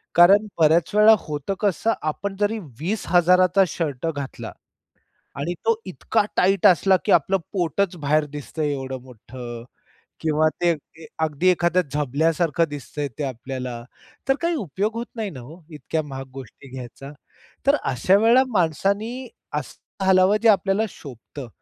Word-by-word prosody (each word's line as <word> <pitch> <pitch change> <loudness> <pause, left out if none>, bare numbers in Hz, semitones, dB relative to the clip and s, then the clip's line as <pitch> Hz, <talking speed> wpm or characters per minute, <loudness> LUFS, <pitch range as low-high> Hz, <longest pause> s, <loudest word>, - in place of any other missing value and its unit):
कारण 195 +5 +7
बऱ्याच 160 +3 +3
वेळा 215 +1 +7
होतं 150 +4 -4
कसं? 210 +2 +1
आपण 195 +6 -3
जरी 210 +2 0 0.2
20,000चा 180 +1 +3
शर्ट 150 -4 -3
घातला 140 -2 -6 0.9
आणि 170 +5 -2
तो 225 -1 +2
इतका 185 +3 0
टाईट 195 +2 +3
असला, 190 +1 +5
की - - +2
आपलं 175 +4 +3 0.2
पोटच 180 0 -1
बाहेर 150 0 +1
दिसतंय 150 +1 -3
एवढं 135 -1 -5
मोठ्ठं 120 -1 -10 0.6
किंवा 155 0 +2
ते 175 -1 +3
ते 160 +2 -16
अगदी 160 +2 +1
एखाद्या 175 0 +2
झबल्यासारखं 155 +3 +1
दिसतंय 145 0 -5
ते 145 - -2
आपल्याला, 125 -1 -5 0.5
तर 270 - +5
काही 340 0 0
उपयोग 205 - -2
होत 235 +1 -3
नाही 220 -3 -3
ना 130 - -9
हो, 155 +8 -13
इतक्या 155 +1 -3
महाग 135 -2 -7
गोष्टी 135 +1 -11
घ्यायचा. 130 +2 -9 0.5
तर 280 +1 +5
अशा 135 +10 +3
वेळेला 230 +4 +5
माणसांनी 200 - -1 0.3
असं 190 - -8
घालावं 190 +2 +5
जे 230 - +4
आपल्याला 195 0 +3
शोभतं. 135 - -10
165 Hz, 140 wpm, -23 LUFS, 140-195 Hz, 0.9 s, कारण